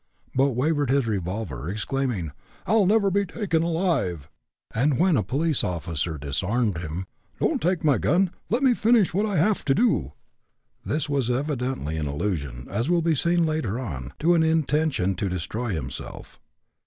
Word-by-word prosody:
but 135 +1 +2
waved 145 +1 +1
his 135 -1 +3
revolver, 90 - -3
exclaiming: 110 - -2 0.3
"I'll 215 -3 +3
never 200 -1 +3
be 200 +2 +2
taken 180 -3 -1
alive!" 160 - -1 0.4
and 135 +4 +2
when 180 0 +3
a 125 - +3
police 145 - +1
officer 85 -2 -2
disarmed 90 - -1
him: 85 +3 -5 0.3
"Don't - - +1
take 175 +1 0
my 145 -3 +3
gun; 180 +3 +2 0.2
let 235 +6 +1
me 260 -2 +5
finish 225 -5 +3
what 205 +4 +1
I 200 -4 -1
have 205 +7 +2
to 135 - +3
do." 90 - +1 0.7
This 150 0 -1
was 140 -4 0
evidently 125 - -2
an 75 -2 -2
allusion, 70 -6 -3
as 115 - -2
will 175 -1 +2
be 165 0 +3
seen 170 +3 +2
later 155 -9 -1
on, 70 - -5
to 170 +3 +3
an 170 - +4
intention 155 - +1
to 100 - -1
destroy 105 +7 -3
himself. 70 -9 -6
135 Hz, 165 wpm, -25 LUFS, -, 0.7 s, me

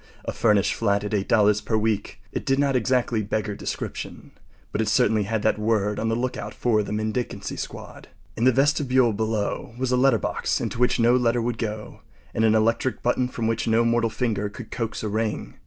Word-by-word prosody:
A - - -2
furnished 105 -4 +2
flat 100 -2 0
at 105 - -4
$8 105 0 +2
per 110 - 0
week. 110 -2 -1
It - - -3
did 135 -1 +1
not 140 -1 +2
exactly 125 -2 +1
beggar 105 0 -2
description, - - -6 0.4
but 110 - -1
it 110 - -1
certainly 105 0 +2
had 110 +1 -2
that 110 - +2
word 105 -1 0
on 115 - 0
the 115 - +1
lookout 125 +2 -3
for 110 -3 +2
the 105 - -5
mendicancy 110 -1 -3
squad. - - -8 0.3
In 115 - 0
the 130 - +7
vestibule 130 -3 +3
below 110 +1 -2
was 130 0 -1
a 125 - +3
letter 130 -2 +4
box - - -1
into - - -4
which 125 0 +2
no 120 +1 +5
letter 120 -1 +2
would 115 0 -2
go, 110 -1 -5 0.3
and 110 - 0
an 110 0 +4
electric 115 +3 +1
button 125 +1 +1
from 120 -2 -4
which 115 +1 -1
no 115 +1 +3
mortal 115 0 +2
finger 105 -4 -1
could 105 +2 -10
coax 115 -2 -3
a - - -1
ring. 110 +1 -2
115 Hz, 205 wpm, -24 LUFS, 105-120 Hz, 0.4 s, the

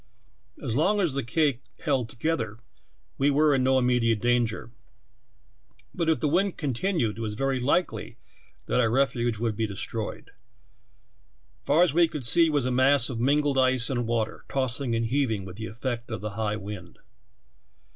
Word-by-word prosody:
As 120 -5 -2
long 195 +9 +2
as 175 -8 +1
the 140 - -1
cake 140 +1 0 0.2
held 135 -7 0
together 115 -5 -2 0.6
we 140 +2 +3
were 150 +1 +3
in 130 -2 +2
no 130 0 +3
immediate 125 -3 +2
danger, 120 -1 0 1.2
but 165 -2 -1
if 160 - +2
the 150 - 0
wind 185 +5 +1
continued 135 - -1
it - - -5
was 105 -2 -3
ver^^. 135 +1 -1
likely 145 +8 -1 0.5
that - - 0
our 115 -2 +3
refuge 120 -2 +1
would 115 -1 -1
be 110 +1 -1
destroyed. 105 +2 -4 1.3
Far 155 +5 +4
as 170 -6 +2
we 170 +1 +5
could 150 -6 -6
see 165 +6 +5
was 145 -4 +1
a 130 - 0
mass 130 0 +4
of 115 - -4
mingled 140 +2 +2
ice 130 -1 +2
and 120 -3 -1
water, 115 -2 -2
tossing 130 -2 -1
and 115 0 0
heaving 115 -5 0
with 95 +1 -10
the 110 0 -5
effect 120 +2 -5
of 110 -2 -5
the 105 0 -4
high 105 0 -2
wind. 100 -4 -8
125 Hz, 170 wpm, -26 LUFS, 115-145 Hz, 1.3 s, we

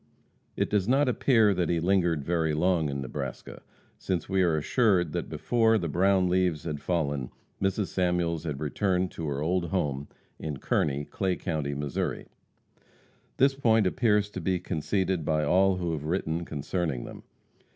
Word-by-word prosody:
It - - +1
does 105 -2 +1
not 135 +3 +3
appear 115 -4 +3
that 90 -3 -1
he 85 - +1
lingered 85 -4 +1
very 80 -1 0
long 85 -2 +2
in 70 -1 -3
Nebraska, 65 - -6 0.4
since 90 -2 -2
we 95 0 +1
are 85 -4 +2
assured 90 - +2
that - - -3
before 115 -2 +2
the 85 -5 -2
brown 95 +3 +2
leaves 90 -4 +1
had 75 -3 -4
fallen, 70 -7 -1 0.3
Mrs. 95 +1 0
Samuels 90 -3 0
had 75 -4 -4
returned 90 +4 0
to 80 - -5
her 70 0 -2
old 90 +2 0
home 75 -6 -2 0.3
near 80 - -4
Kearney, 70 +2 -1
Clay 95 +2 -1
county, 75 -6 -3
Missouri. 70 -1 -3 1.1
This 135 +1 +4
point 115 -6 +3
appears 105 +1 +2
to 95 - -5
be 90 +2 +1
conceded 90 +1 -1
by 75 0 +1
all 95 +5 +3
who 90 -2 -2
have 75 -2 -4
written 85 0 -1
concerning 75 -3 -3
them. - - -9
90 Hz, 160 wpm, -28 LUFS, 75-95 Hz, 1.1 s, This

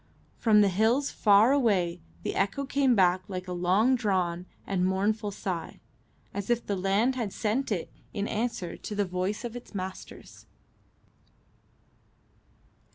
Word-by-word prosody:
From 215 -2 +4
the 205 - +5
hills 225 +9 +2
far 210 +3 +5
away 200 -11 +1 0.2
the - - -2
echo 205 +9 0
came 270 -2 +2
back 185 -2 +4
like 185 -2 -5
a - - -5
long 185 +8 +3
drawn 185 -7 0 0.2
and 190 -2 -1
mournful 205 +3 0
sigh, 185 -4 -5 0.5
as 200 +1 -5
if 240 0 +1
the 200 - -1
land 195 +7 +2
had 235 -6 -3
sent 225 +6 -1
it 180 -5 -3 0.2
in 205 -1 -2
answer 215 -6 -2
to 210 - -7
the 205 0 +1
voice 185 +5 -3
of 240 0 -6
its 240 -3 -10
masters. 190 0 -8
205 Hz, 145 wpm, -28 LUFS, 185-230 Hz, 0.5 s, the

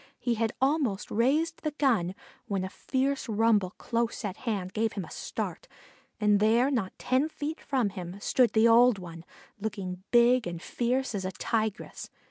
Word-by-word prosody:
He 240 - 0
had 225 -1 -1
almost 265 -7 0
raised 300 +9 +1
the 305 -2 -3
gun 210 - +2 0.3
when 195 -2 -1
a 190 - -5
fierce 270 -1 -1
rumble 210 -3 +2
close 235 -1 -2
at 195 -2 -3
hand 195 -6 -3
gave 220 0 0
him 195 -4 -4
a - - -14
start, - - -5 0.5
and 210 -1 +4
there, 230 +6 +3
not 220 -8 -2
ten 260 +5 +1
feet 310 0 -5
from 255 -6 0
him, 185 0 -7
stood 240 +2 +2
the 220 +1 +5
old 235 0 +6
one, 170 -3 -9 0.4
looking 195 -4 -4
big 240 -1 +4
and 170 -1 -5
fierce 250 +7 -1
as 195 -2 -2
a 185 - -2
Tigress. 220 +2 -3
225 Hz, 170 wpm, -28 LUFS, 195-255 Hz, 0.5 s, old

